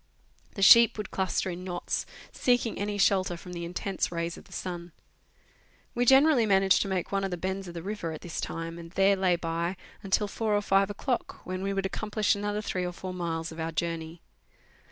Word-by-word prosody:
The 195 - -1
sheep 230 +3 +8
would 210 -2 -5
cluster 190 0 -1
in 175 +1 -7
knots, 175 -1 -3 0.2
seeking 245 -2 +1
any 205 0 -2
shelter 190 -3 +2
from 180 +1 -10
the 170 -1 -5
intense 180 +3 -2
rays 170 0 -2
of - - -13
the - - -20
sun. 175 -2 -6 1.0
We 245 +1 +1
gene 270 +4 +7
rally 260 -8 +3
managed 195 -1 +4
to - - -1
make 190 -2 -2
one 195 0 0
of 195 - -1
the 180 - -3
bends 190 +2 -3
of 175 - -9
the 165 - -5
river 195 -4 -4
at 155 - -7
this 175 -3 -5
time, 165 0 -5
and 165 0 -9
there 195 +1 +4
lay 185 -2 +2
by 170 +2 -2 0.2
until 205 +1 +1
four 210 0 0
or - - 0
five 195 0 +3
o'clock, 240 +5 -3
when 185 0 -4
we 195 +1 -1
would 195 -1 -1
accom 210 +2 -4
plish 210 -1 +3
another 205 +1 -2
three 185 -3 -2
or 180 0 -3
four 185 +1 -6
miles 165 -2 -3
of 160 - -9
our 160 0 -2
journey. 165 0 -4
190 Hz, 215 wpm, -28 LUFS, 170-205 Hz, 1.0 s, sheep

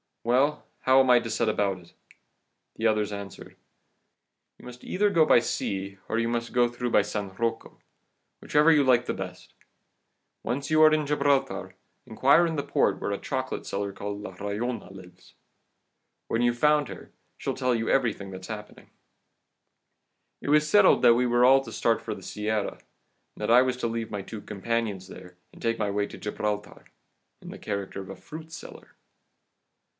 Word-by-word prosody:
'Well, 135 +6 +1 0.2
how 130 +1 +5
am 130 -1 +4
I 125 - +7
to 115 - -6
set 115 +1 0
about 100 -3 0
it?' 85 -1 -19 0.8
"The 110 - +1
others 105 -1 +1
answered: 100 -1 -8 1.0
"'You - - -16
must 125 0 -11
either 205 +2 +1
go 165 -4 +4
by 120 - +6
sea, 100 -4 -3
or - - 0
you 115 0 +1
must 115 0 -3
get 120 -1 +2
through 125 0 -2
by - - +4
San 105 -2 -4
Rocco, 115 +3 -3 0.6
whichever 150 +2 +4
you 150 -3 +5
like 125 -2 +3
the - - -2
best; - - -8 0.9
once 135 +5 -3
you 155 0 +4
are 155 0 +8
in 155 -1 +1
Gibraltar, 135 -10 0 0.3
inquire 135 +8 +4
in 165 - -3
the 140 - -2
port - - +1
where - - -3
a - - -1
chocolate - - -4
seller 100 0 -3
called 100 +1 -5
La 95 -3 -8
Rollona 105 +1 -4
lives. 90 -2 -15 0.9
When 115 - 0
you've 120 0 +2
found 150 +1 +3
her, - - -10 0.3
she'll - - -3
tell 125 -2 +1
you 115 0 -2
everything 110 -7 0
that's 95 -1 -9
happening.' 105 -2 -9 1.5
"It - - -5
was 150 +1 +4
settled 205 +1 +5
that 120 - +7
we 125 +1 +2
were 120 +1 +4
all 135 +1 +6
to 120 -4 -10
start 115 0 +1
for - - -5
the - - -12
Sierra, 105 -1 -3 0.6
that 105 - -1
I 125 +2 +8
was 130 -1 -1
to 120 - -1
leave 115 -1 -3
my 100 -2 -4
two 110 +1 -8
companions 105 -2 -3
there, 90 -1 -12 0.2
and - - -15
take 115 0 -1
my 105 -2 0
way 100 0 -1
to - - -11
Gibraltar, 105 0 -4 0.6
in - - -10
the - - -9
character 100 -1 -4
of 95 - -11
a - - -7
fruit 160 0 -11
seller. 165 - -11
115 Hz, 180 wpm, -27 LUFS, 105-130 Hz, 1.5 s, are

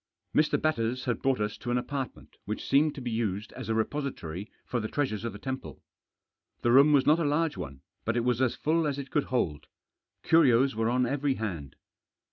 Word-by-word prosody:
Mr. 150 0 +3
Batters 130 -4 0
had 120 -4 -1
brought 135 -3 +1
us 105 0 -2
to 120 - -5
an 120 - +2
apartment 135 +1 -5
which 105 +2 -4
seemed 145 +2 +3
to 140 - -7
be 120 -1 -3
used 105 -2 -2
as 125 -4 -7
a 110 - +1
repository 110 - -3
for 120 - -1
the 110 - -2
treasures 110 -6 -2
of 115 - -2
the 105 - -9
temple. 130 +3 -6 0.8
The 120 - +3
room 140 +4 +7
was 140 -3 +4
not 155 +3 +5
a - - +1
large 150 +2 +1
one, 70 -8 -7 0.2
but 115 +1 0
it 120 - +1
was 125 0 +1
as 125 -2 +2
full 160 +1 +1
as 140 -1 -2
it 140 -1 -6
could 150 - +1
hold. 85 - -1 0.6
Curios 135 -5 +4
were 115 +1 +1
on 125 +1 +2
every 140 +1 0
hand. 90 - -5
125 Hz, 210 wpm, -29 LUFS, 110-140 Hz, 0.8 s, room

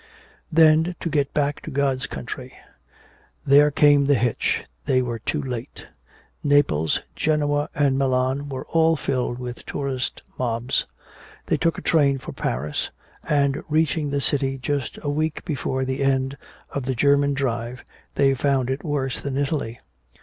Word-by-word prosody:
Then 160 +2 +5
to 170 - -3
get 140 -2 +1
back 145 -1 0
to - - -7
God's 135 -4 0
country! 65 -9 -7 0.9
There 145 +2 +6
came 145 -1 +4
the 145 - +5
hitch, 120 0 0 0.2
they 130 -3 +3
were 120 -2 -3
too 150 - -2
late. 125 -1 -6 0.6
Naples, 135 - +3
Genoa, 145 0 +1
and 135 -2 +2
Milan, 130 +1 0
all 160 +4 +1
were - - -1
filled 125 -3 -1
with 125 -1 -7
tourist 135 -2 -3 0.2
mobs. 120 +1 0 0.6
They - - +1
took 165 - +1
a - - -7
train 140 -4 +3
for - - -8
Paris, 75 +4 -2 0.4
and 140 -2 +1
reaching 155 -1 +1
the 140 0 -1
city 135 -1 +1
just 140 -1 -3
a 145 - -1
week 155 +1 -2
before 130 -4 -2
the 130 +1 -2
end 135 0 +1 0.4
of 140 -3 -3
the 130 -1 -1
German 140 +2 +3
drive 120 -2 -2 0.3
they 135 -1 +4
found 135 -1 +1
it 135 +2 -3
worse 140 -4 -2
than 135 -1 -3
Italy. 140 -5 -2
140 Hz, 150 wpm, -23 LUFS, 130-145 Hz, 0.9 s, There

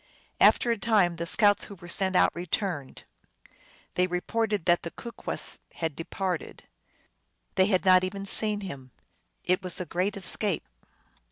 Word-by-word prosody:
After 240 - +5
a 230 - -1
time, 200 -7 +2
the 170 0 -4
scouts 205 +2 +4
who 200 - -10
were 175 -1 -13
sent 190 +2 0
out - - +5
returned. 170 -4 -3 0.9
They 180 0 +2
reported 205 +2 -1
that 175 -1 +3
the 170 - -6
Kookwes 235 +6 -6 0.2
had 160 -3 -3
departed. 180 +1 -4 0.9
They 190 0 +3
had 190 -2 +1
not 185 -1 +6
even 195 +1 -4
seen 210 +1 +2
him. 140 -9 -8 0.5
It 180 +2 +1
was 180 -2 0
a 180 - -3
great 185 +5 -1
escape. 195 0 0
185 Hz, 150 wpm, -27 LUFS, 175-205 Hz, 0.9 s, not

